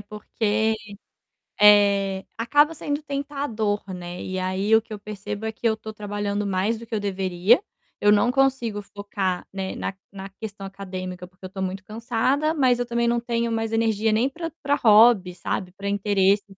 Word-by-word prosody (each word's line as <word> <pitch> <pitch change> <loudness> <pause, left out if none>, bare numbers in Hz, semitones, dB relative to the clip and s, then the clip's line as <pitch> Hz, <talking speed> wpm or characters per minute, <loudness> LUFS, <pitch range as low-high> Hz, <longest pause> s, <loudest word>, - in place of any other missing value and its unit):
porque, 215 +1 -1 0.9
eh, 200 -2 +5
acaba 290 +7 +3
sendo 290 0 -3
tentador, 275 -8 -2
né 175 0 -7
e 185 0 -3
aí 190 +3 0
o 225 - +5
que 220 - -11
eu 205 - -6
percebo 210 +1 -6
é 220 - -1
que 230 +1 -2
eu 220 - +3
estou 220 0 -7
trabalhando 205 0 -3
mais 200 +4 0
do 230 - -10
que 225 - -4
eu - - 0
deveria, 190 - +2 0.4
eu 205 - +3
não 210 +4 +4
consigo 250 -6 +1
focar, 200 -2 -3
né, 190 -1 -4
na - - -3 0.2
na 195 0 -8
questão 200 0 -8
acadêmica, 185 -2 -7
porque 180 +1 -31
eu - - -4
estou 190 0 -5
muito 185 0 -4
cansada 240 +8 0
mas 255 -5 +3
eu 245 - 0
também 235 0 0
não 235 0 +2
tenho 235 0 -1
mais 225 0 -1
energia 225 -1 +2
nem 240 +5 +2
para 330 +3 -5
para 285 +1 +2
hobby 215 -5 +5
sabe, 180 +1 -3
para 200 +1 -5
interesse 200 0 +2
210 Hz, 180 wpm, -24 LUFS, 195-235 Hz, 0.9 s, eh